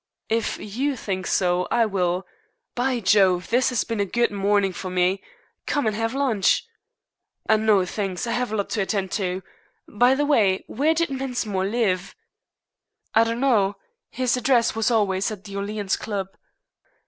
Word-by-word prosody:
"If 225 0 0
you 260 +7 -2
think 190 -6 -4
so, 180 -1 +1
I 235 -1 +3
will. 185 -3 -1 0.5
By 250 0 0
Jove, 190 -3 +3
this 255 +2 +3
has 245 -5 0
been 230 -2 -4
a 200 - +2
good 235 +4 +1
morning 200 -1 +1
for 185 +2 -6
me. 185 +1 +1 0.5
Come 290 -3 0
and 215 -1 0
have 225 +3 -2
lunch." 265 - +2 0.8
"No, 215 -3 +3
thanks. 190 0 -3
I 230 - -3
have 245 -1 -1
a - - -1
lot 200 -2 -2
to 210 - 0
attend 195 -1 -1
to. 185 -2 -2 0.4
By 245 +5 +3
the 290 +2 +1
way, 210 -10 +3
where 305 +6 +1
did 335 0 +1
Mensmore 245 -8 -2
live?" 195 -5 -1 1.0
"I 225 - +6
don't 230 +1 -2
know. 210 -7 +3 0.3
His 255 -2 0
address 250 -1 +2
was 225 +1 +1
always 200 -4 +1
at 210 -3 -8
the 200 -1 -9
Orleans 200 0 -2
Club." 195 -3 -4
215 Hz, 165 wpm, -23 LUFS, 195-240 Hz, 1.0 s, I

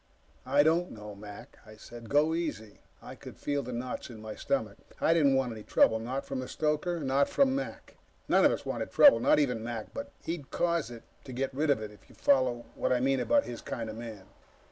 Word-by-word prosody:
"I 140 +2 +5
don't 165 +3 +2
know, 105 -1 -9
Mac," 105 0 -11
I 110 -1 -14
said. 115 +1 -11
"Go 150 +3 +3
easy." 150 -11 -4 0.2
I - - -8
could - - -12
feel 145 -1 -1
the 125 -1 -7
knots 125 +2 -5
in 115 -3 -10
my 110 0 -7
stomach. 110 -6 -2 0.2
I 165 - +4
didn't 145 -5 +4
want 130 -2 +1
any 110 -1 -7
trouble. 110 +1 +3
Not 130 +4 -4
from 135 - -4
the 130 - -5
stoker, 155 +3 -1
not 140 -1 +1
from 270 -1 +3
Mac. 275 - -6 0.3
None - - +4
of - - +6
us - - -4
wanted - - -3
trouble 285 - +7
not - - +4
even 125 -7 +1
Mac, 115 -2 -6
but 280 0 -6
he'd 165 -5 -5
cause 170 -4 0
it 120 -1 -10 0.2
to 130 - -8
get 135 +2 -2
rid 150 +3 0
of 130 -6 +2
it, 105 - -7
if 105 - -19
you - - -17
follow 130 -3 +2
what - - -1
I 125 - +3
mean 135 +1 +2
about 285 - +3
his 120 - -7
kind 115 -2 -5
of - - -9
man. 110 -4 -8
130 Hz, 230 wpm, -30 LUFS, 115-150 Hz, 0.3 s, trouble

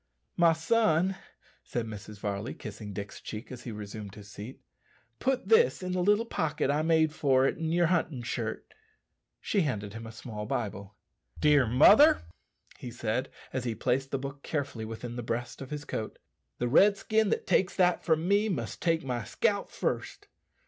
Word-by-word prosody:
"My 170 -1 +5
son," 185 +1 +2 0.5
said 120 -2 -3
Mrs. 105 -1 -8
Varley, 100 +3 -4
kissing 105 0 -8
Dick's 100 +1 -7
cheek 110 +4 -7
as 125 -1 -9
he 120 - -4
resumed 105 -1 -7
his 105 -1 -12
seat, 105 +7 -9 0.6
"put 260 0 0
this 450 - +4
in 185 - -3
the 180 0 0
little 205 +5 +3
pocket 155 - -1
I 150 +1 +1
made 160 -1 +3
for 135 -4 +3
it - - +1
in 160 -1 -1
your 175 +1 +3
hunting 160 -7 0
shirt." 120 - -4 0.7
She 200 - +1
handed 105 - -2
him 115 0 -7
a - - -8
small 110 -2 -7
pocket 110 -3 -1
Bible. 100 0 -11 0.4
"Dear 145 -4 +5
mother," 150 - +7 0.6
he 125 - -6
said, 115 +1 -2 0.2
as 130 - -2
he 120 -3 -2
placed 130 +5 0
the 135 - -1
book 140 +1 -7
carefully 140 -8 -3
within 115 +2 -6
the - - -2
breast 120 +3 -4
of 135 - -7
his 150 -1 -5
coat, 110 - -4 0.4
"the 120 - -1
Redskin 205 - +4
that - - -1
takes 185 - +2
that 180 -2 +3
from 160 0 +1
me 205 +2 +3
must 185 - -3
take 165 -2 +1
my 125 -3 -2
scalp - - 0
first. - - -3
135 Hz, 180 wpm, -29 LUFS, 110-165 Hz, 0.7 s, mother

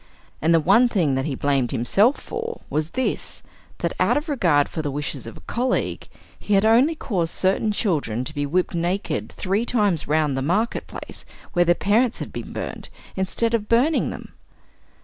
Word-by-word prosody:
And 160 - +2
the 165 - +6
one 200 +10 +5
thing 170 - +1
that 135 +1 0
he 145 -4 -2
blamed 135 -3 +1
himself 195 - +2
for 460 +1 -5
was 155 +2 -1
this: 260 - -2 0.3
that - - -2
out - - +3
of 300 +2 -3
regard 170 - +3
for 160 - -4
the 150 - -2
wishes 140 -3 -4
of 115 - -9
a - - -13
colleague, 250 +2 -2 0.3
he 210 - 0
had 195 +2 +4
only 250 +9 +4
caused 175 - -2
certain 195 +3 +1
children 150 - -1
to 130 - -6
be 145 -1 -2
whipped 180 +6 0
naked 175 +4 -2
three 195 +4 -1
times 205 -9 +1
round 150 -2 +1
the 135 - -1
market 195 - 0
place - - -8 0.3
where 175 0 +3
their 175 0 +4
parents 225 +6 +2
had - - -7
been - - -6
burned, - - -6 0.3
instead 210 +5 -1
of 215 -2 -1
burning 255 +7 +3
them. - - -9
185 Hz, 190 wpm, -23 LUFS, 150-230 Hz, 0.3 s, the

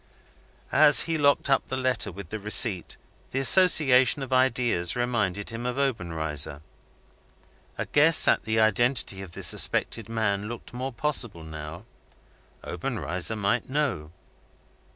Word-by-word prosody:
As 150 -2 +5
he 165 - -2
locked 140 -2 +1
up 135 -1 0
the 130 - -4
letter 130 -5 -1
with 95 -1 -11
the 110 - -6
receipt, 105 -2 +2 0.3
the - - -6
association 135 -4 +5
of 130 - -6
ideas 120 -9 0
reminded 115 -5 -2
him 115 +1 -7
of 125 +1 -4
Obenreizer. 80 - -3 1.1
A - - -4
guess 150 +2 +4
at - - +2
the 110 +1 -1
identity 110 -1 0
of 95 -3 -11
the - - -7
suspected 115 -2 +1
man 105 -2 -2
looked 120 0 -10
more 130 +2 -5
possible 120 - -1
now. 80 +4 -10 0.8
Obenreizer 90 - -2
might 105 +4 -2
know. 130 - -3
115 Hz, 130 wpm, -25 LUFS, 95-130 Hz, 1.1 s, As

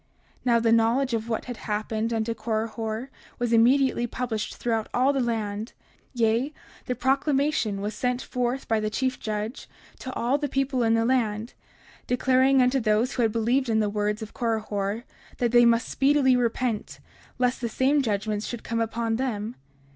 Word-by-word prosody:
30:57 - - -33
Now 235 -2 +4
the 230 0 +2
knowledge 235 +3 +3
of 225 0 -2
what 225 - -2
had 245 -2 -6
happened 215 +2 -2
unto 225 0 -1
Korihor 225 +2 -3 0.3
was 240 -1 -1
immediately 240 +1 +4
published 235 -3 -3
throughout 225 -2 -1
all 260 +3 +3
the 275 - 0
land; 220 -2 -2 0.4
yea, 235 +5 +1 0.3
the 250 - -1
proclamation 270 -4 +1
was 210 +2 -3
sent 250 +2 -1
forth 250 +1 -2
by 225 -2 +2
the 215 0 -1
chief 260 +3 -1
judge 215 +3 -4 0.3
to 260 - -6
all 255 +5 0
the 290 -1 -2
people 270 -1 0
in 225 -1 +3
the 225 0 +2
land, 230 -2 0 0.5
declaring 260 +1 +4
unto 250 +2 +2
those 220 +2 +1
who 250 - -1
had 225 -2 +2
believed 235 +4 +1
in 220 -1 +2
the 210 -1 +1
words 210 +1 -1
of 215 - -10
Korihor 215 -2 -2 0.3
that 240 -2 +1
they 240 0 +6
must 230 0 +3
speedily 275 -2 +3
repent, 240 -2 -1 0.4
lest 250 0 0
the 235 - -1
same 275 +5 +2
judgments 210 -2 -2
would 240 -2 -6
come 230 0 -1
unto 225 0 -1
them. 230 -3 -2
235 Hz, 175 wpm, -26 LUFS, 220-255 Hz, 0.5 s, they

